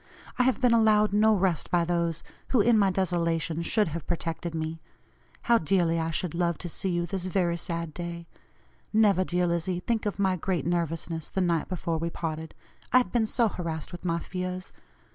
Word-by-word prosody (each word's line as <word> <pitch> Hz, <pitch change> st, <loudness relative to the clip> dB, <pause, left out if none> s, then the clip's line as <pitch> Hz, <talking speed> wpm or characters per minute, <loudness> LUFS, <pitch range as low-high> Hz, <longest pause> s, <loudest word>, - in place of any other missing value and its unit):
I -, -, +6 dB
have 260 Hz, 0 st, +2 dB
been 250 Hz, -3 st, +4 dB
allowed 215 Hz, -2 st, +4 dB
no 215 Hz, +1 st, +5 dB
rest 185 Hz, -4 st, 0 dB
by 175 Hz, -2 st, +2 dB
those 170 Hz, -1 st, -1 dB, 0.2 s
who, 255 Hz, -, +2 dB
in 230 Hz, +3 st, +5 dB
my 200 Hz, -2 st, +4 dB
desolation, 170 Hz, -3 st, 0 dB
should 210 Hz, +2 st, +2 dB
have 160 Hz, 0 st, -6 dB
protected 165 Hz, 0 st, -3 dB
me. 160 Hz, 0 st, -4 dB, 0.6 s
How 235 Hz, -1 st, +4 dB
dearly 165 Hz, 0 st, +2 dB
I 160 Hz, 0 st, -1 dB
should 165 Hz, 0 st, -2 dB
love 170 Hz, -1 st, 0 dB
to 175 Hz, -, -6 dB
see 190 Hz, -, -2 dB
you 175 Hz, -1 st, 0 dB
this 190 Hz, 0 st, -3 dB
very 180 Hz, -2 st, +1 dB
sad 170 Hz, -1 st, -4 dB
day. 170 Hz, 0 st, -6 dB, 0.7 s
Never, 210 Hz, -4 st, +4 dB
dear 180 Hz, 0 st, 0 dB
Lizzie, 175 Hz, +1 st, -1 dB
think 220 Hz, +2 st, -1 dB
of 205 Hz, -, -3 dB
my 190 Hz, -2 st, +1 dB
great 180 Hz, 0 st, -1 dB
nervousness 165 Hz, -1 st, -2 dB
the 190 Hz, -, -1 dB
night 170 Hz, -3 st, 0 dB
before 170 Hz, -3 st, -2 dB
we 165 Hz, +1 st, -1 dB
parted; 160 Hz, -1 st, -5 dB, 0.4 s
I -, -, +6 dB
had 245 Hz, -8 st, +2 dB
been 225 Hz, -2 st, +2 dB
so 235 Hz, +1 st, +2 dB
harassed 165 Hz, -6 st, -4 dB
with 175 Hz, -, -9 dB
my 170 Hz, -2 st, 0 dB
fears. 185 Hz, +1 st, -5 dB
175 Hz, 195 wpm, -27 LUFS, 165-195 Hz, 0.7 s, I